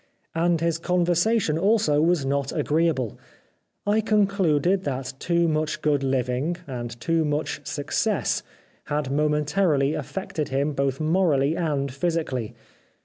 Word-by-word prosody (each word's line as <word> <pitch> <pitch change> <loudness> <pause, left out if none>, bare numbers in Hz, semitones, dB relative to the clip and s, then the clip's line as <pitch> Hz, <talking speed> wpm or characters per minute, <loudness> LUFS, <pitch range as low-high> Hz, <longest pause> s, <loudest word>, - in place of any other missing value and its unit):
And 165 0 +1
his 165 -1 0
conversation 175 +1 +1
also 200 -6 +3
was 165 -3 +2
not 140 0 -1
agreeable. 150 -7 0 0.7
I 210 +2 +2
concluded 195 -4 +2
that 135 -1 -3
too 170 -1 +1
much 155 -1 -1
good 145 -2 +2
living, 135 +4 0
and 120 -4 -6
too 165 +4 +1
much 150 0 -2
success 145 -3 0 0.4
had 145 -2 -2
momen 150 +1 +1
tarily 150 -4 +2
affected 155 +1 -4
him 140 +3 0
both 135 -1 -1
morally 155 -3 +2
and 140 -6 -1
physically. 140 -7 -2
155 Hz, 125 wpm, -24 LUFS, 140-170 Hz, 0.7 s, also